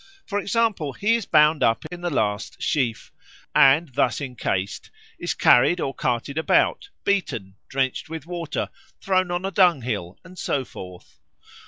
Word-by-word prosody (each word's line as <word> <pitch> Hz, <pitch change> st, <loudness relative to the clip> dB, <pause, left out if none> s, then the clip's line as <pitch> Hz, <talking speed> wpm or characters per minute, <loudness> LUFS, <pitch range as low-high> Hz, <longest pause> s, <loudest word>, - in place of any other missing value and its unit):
For 205 Hz, -1 st, -2 dB
example, 205 Hz, -, 0 dB
he 210 Hz, -, +1 dB
is 230 Hz, -4 st, -1 dB
bound 150 Hz, 0 st, +4 dB
up 115 Hz, 0 st, +2 dB
in 175 Hz, 0 st, -7 dB
the 175 Hz, -, -1 dB
last 105 Hz, -8 st, -2 dB
sheaf, 125 Hz, -7 st, -1 dB, 0.4 s
and, 140 Hz, +2 st, +5 dB
thus -, -, +1 dB
encased, 115 Hz, -8 st, -3 dB, 0.3 s
is -, -, -2 dB
carried 175 Hz, +8 st, +5 dB
or 135 Hz, -, -2 dB
carted 130 Hz, +4 st, -2 dB
about, 405 Hz, -, +2 dB
beaten, 115 Hz, -, -1 dB
drenched 130 Hz, +2 st, -2 dB
with 160 Hz, -2 st, -6 dB
water, 170 Hz, -3 st, -4 dB, 0.3 s
thrown 185 Hz, -2 st, +1 dB
on 175 Hz, +1 st, -2 dB
a 195 Hz, -, -2 dB
dunghill, 125 Hz, -, +1 dB
and 185 Hz, +1 st, -12 dB
so 135 Hz, -2 st, -1 dB
forth. 90 Hz, -5 st, -12 dB
150 Hz, 150 wpm, -23 LUFS, 125-180 Hz, 0.4 s, and